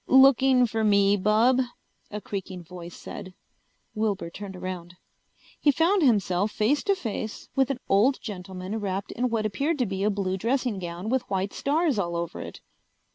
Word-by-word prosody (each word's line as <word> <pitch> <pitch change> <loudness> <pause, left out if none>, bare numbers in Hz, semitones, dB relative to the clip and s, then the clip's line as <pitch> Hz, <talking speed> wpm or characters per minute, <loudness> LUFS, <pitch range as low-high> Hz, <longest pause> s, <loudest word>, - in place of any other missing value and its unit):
"Looking 265 -1 +6
for 225 -1 -1
me, 200 -1 +4
bub?" 220 +6 +3 0.5
a 210 - -5
creaking 190 -3 -6
voice 175 0 -10
said. 185 -1 -9 0.6
Wilbur 205 -6 -1
turned 195 +1 -8
around. 180 -1 -6 0.6
He 295 - +3
found 340 +7 +3
himself 205 - +2
face 230 +8 +1
to 400 -1 +3
face 220 - -5
with 270 -1 +3
an 270 -2 -2
old 225 +8 +3
gentleman 190 0 -6
wrapped 195 -1 -3
in 250 +1 -1
what 225 -2 -1
appeared 280 - 0
to 250 - +1
be 195 -2 -3
a 210 - +3
blue 195 -2 -1
dressing 235 0 0
gown 175 +3 -5
with 260 +1 +2
white 195 0 -1
stars 295 -4 +1
all 170 -3 -1
over 170 0 -3
it. - - -9
210 Hz, 170 wpm, -26 LUFS, 190-255 Hz, 0.6 s, Looking